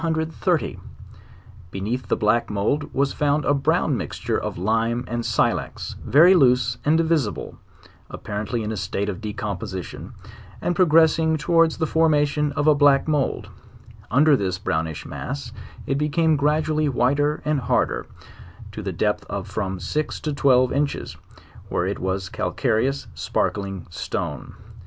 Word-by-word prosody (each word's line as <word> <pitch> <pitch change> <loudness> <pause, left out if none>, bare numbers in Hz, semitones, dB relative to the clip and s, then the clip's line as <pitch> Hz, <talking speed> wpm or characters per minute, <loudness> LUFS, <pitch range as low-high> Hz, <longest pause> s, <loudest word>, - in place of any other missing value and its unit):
Beneath 105 +8 -4
the - - +1
black, 110 +2 +1
mould 105 +9 -1
was 140 0 0
found 145 0 +1
a 145 - +3
brown 140 -1 +1
mixture - - -3
of - - -3
lime 115 +5 0
and 120 0 -3
silex, - - -1
very 170 +7 +6
loose 125 -6 +3
and 155 +2 +3
divisible, 160 -9 -1 0.5
apparently 105 +3 -4
in 105 - -3
,1 110 - -3
state 100 +2 -2
of 100 +1 -5
decomposition, 100 -4 -5 0.5
and 175 - -1
pro 185 -1 +4
gressing 160 0 +4
towards 165 +1 +2
the 160 - 0
.formation 150 -2 +2
of 145 0 -1
a 155 - +6
black 145 -1 +4
mould; 150 -4 -1 0.6
under 145 +5 +5
this 95 -6 -1
brownish 80 -5 -3
mass 70 - -6 0.3
it 135 - -1
became 155 +2 +2
gradually 150 +1 +1
whiter 145 +4 +1
and 150 -1 +1
harder, 125 0 0 0.6
to - - -7
the - - -3
depth - - 0
of - - -5
from 95 -3 -3
six 150 +12 -2
to 150 - -3
twelve 130 -3 +3
inches, 140 +1 -2 0.5
where - - 0
it - - -3
was 95 +1 -2
a - - -14
calcare 110 0 0
ous 140 0 -5
sparkling 95 -3 -2
stone. - - -5
135 Hz, 145 wpm, -23 LUFS, 105-150 Hz, 0.6 s, very